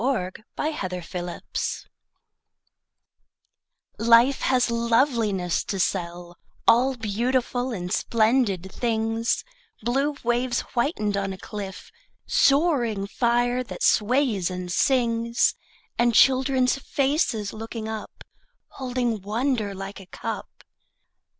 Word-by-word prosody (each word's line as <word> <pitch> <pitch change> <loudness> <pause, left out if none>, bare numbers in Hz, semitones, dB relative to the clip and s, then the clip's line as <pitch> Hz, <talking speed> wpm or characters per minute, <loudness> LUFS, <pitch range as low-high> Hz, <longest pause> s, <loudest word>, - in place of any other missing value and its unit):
Sara 230 -9 0 0.3
Teasdale 180 - -4
Barter - - -3 2.1
LIFE 235 +4 +5
has 250 -2 +2
loveliness 230 - +1
to 195 - -3
sell, 175 -1 -2 0.3
All 255 +3 +5
beautiful 245 +3 -1
and 180 -3 -3
splendid 215 -6 +1
things, 225 -1 0 0.4
Blue 275 +5 0
waves 240 +1 +1
whitened 235 -5 0
on 195 -1 -2
a - - -8
cliff, 195 0 -8 0.3
Soaring 275 - +2
fire 240 +3 +1
that 235 - -7
sways 225 -5 +2
and 180 -1 -5
sings, 235 0 +2 0.5
And 240 -1 +3
children's 260 0 +4
faces 270 -7 0
looking 225 0 -6
up, 220 -1 -7 0.5
Holding 245 -4 -2
wonder 215 0 -1
like 195 +1 -7
a 190 - -13
cup. - - -5
230 Hz, 100 wpm, -25 LUFS, 200-255 Hz, 2.1 s, LIFE